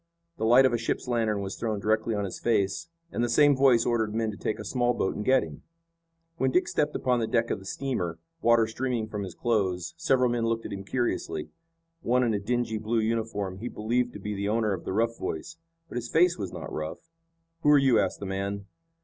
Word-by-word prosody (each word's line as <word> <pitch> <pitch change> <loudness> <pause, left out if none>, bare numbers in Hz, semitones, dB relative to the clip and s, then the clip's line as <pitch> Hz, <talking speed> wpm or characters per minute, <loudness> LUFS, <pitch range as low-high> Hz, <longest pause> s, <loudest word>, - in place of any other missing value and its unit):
The - - -1
light 125 +4 +7
of 130 - +3
a 120 - +1
ship's 115 - -2
lantern 110 -4 0
was 95 -1 -4
thrown 110 -3 -2
directly 110 +2 +1
on 100 -1 -1
his 95 - -6
face, 105 +4 0 0.2
and 120 - -1
the 120 - 0
same 145 +4 +5
voice 130 -3 +4
ordered 110 -3 0
men 110 -1 0
to - - -8
take 105 - -2
a 105 - -7
small 120 +2 +1
boat 95 - -1
and 105 - -3
get 130 +3 +4
him. 75 -3 -9 0.8
When 130 - +2
Dick 180 +7 +2
stepped 150 0 0
upon 125 -1 +1
the 115 - 0
deck 115 0 +1
of - - -1
the 95 - -14
steamer, 95 -13 -2 0.2
water 115 -1 +5
streaming 120 0 -2
from 105 -1 -4
his 95 -3 -6
clothes, 105 - 0
several 130 -7 +2
men 115 -1 0
looked 115 0 -1
at - - -5
him 100 0 -5
curiously. 120 -8 -2 0.5
One 125 -1 +2
in 115 -2 +1
a 100 - 0
dingy 115 +1 -1
blue 110 +2 -1
uniform 110 -4 -2
he 120 - -4
believed 120 +2 -1
to - - -8
be 105 +1 -4
the 100 0 -2
owner 110 -1 +1
of 95 - -6
the - - -3
rough 115 +3 0
voice. 120 - -5 0.3
But 125 - -6
his 120 -1 -4
face 170 +1 +4
was 100 -3 -5
not - - -7
rough. 80 - -6 0.5
"Who 150 - +3
are 150 - +8
you?" 135 -4 +4
asked - - 0
the 100 - -5
man. 100 +1 -3
115 Hz, 235 wpm, -27 LUFS, 100-125 Hz, 0.8 s, are